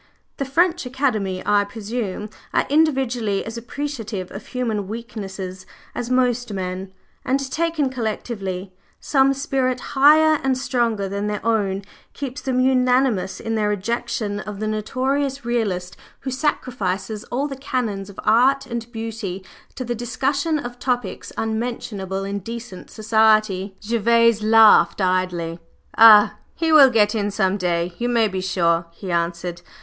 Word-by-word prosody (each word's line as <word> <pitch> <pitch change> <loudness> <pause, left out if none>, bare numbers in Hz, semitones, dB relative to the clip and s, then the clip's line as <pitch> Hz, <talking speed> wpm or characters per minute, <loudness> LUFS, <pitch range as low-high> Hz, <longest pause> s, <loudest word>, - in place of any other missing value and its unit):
"The 275 - -2
French 335 +2 +1
Academy, 220 -8 -1
I 205 0 +3
presume, 210 0 -5 0.2
are - - +3
individually 260 -9 +1
as 225 - -6
appreciative 230 -6 -5
of 195 - -9
human 225 -6 -2
weaknesses 195 -4 -7 0.3
as 245 -1 -4
most 250 -2 +1
men; 185 0 -4 0.3
but 265 - +1
taken 325 -3 0
collectively, 200 -6 -4 0.3
some 275 -1 +3
spirit 260 -2 -1
higher 305 +2 +6
and 265 -1 +1
stronger 235 -6 0
than 200 +2 -3
their 210 0 -4
own 200 -4 0 0.3
keeps 265 -3 -6
them 255 -1 -1
unanimous 255 -6 +2
in 225 - -3
their 215 -2 +1
rejection 210 0 -2
of 210 -1 -7
the 215 - -2
notorious 260 +5 -1
Realist 200 -7 -1 0.3
who 265 - -4
sacrifices 220 -8 -2
all 275 +4 -2
the 275 - -6
canons 235 -7 -3
of 200 - -11
art 265 +4 +4
and 235 -1 -6
beauty 225 -5 -5 0.3
to 255 - -5
the 240 - -2
discussion 275 +6 -1
of 245 -4 -7
topics 245 -1 -2
unmentionable 220 -4 -3
in 200 +1 -3
decent 230 -1 -8
society." 215 -3 +2
Gervase 230 0 +3
laughed 220 0 +6
idly. 180 -3 0 0.4
"Oh, 215 -2 +8 0.2
he 325 -1 0
will 290 -4 +8
get 210 -3 +3
in 205 -2 -1
some 195 -1 +1
day, 175 -2 -1
you 240 +1 0
may 230 -2 +3
be 190 -2 -3
sure," 170 -2 +1
he 185 +1 -7
answered. 170 +1 -2
225 Hz, 140 wpm, -22 LUFS, 195-255 Hz, 0.4 s, Oh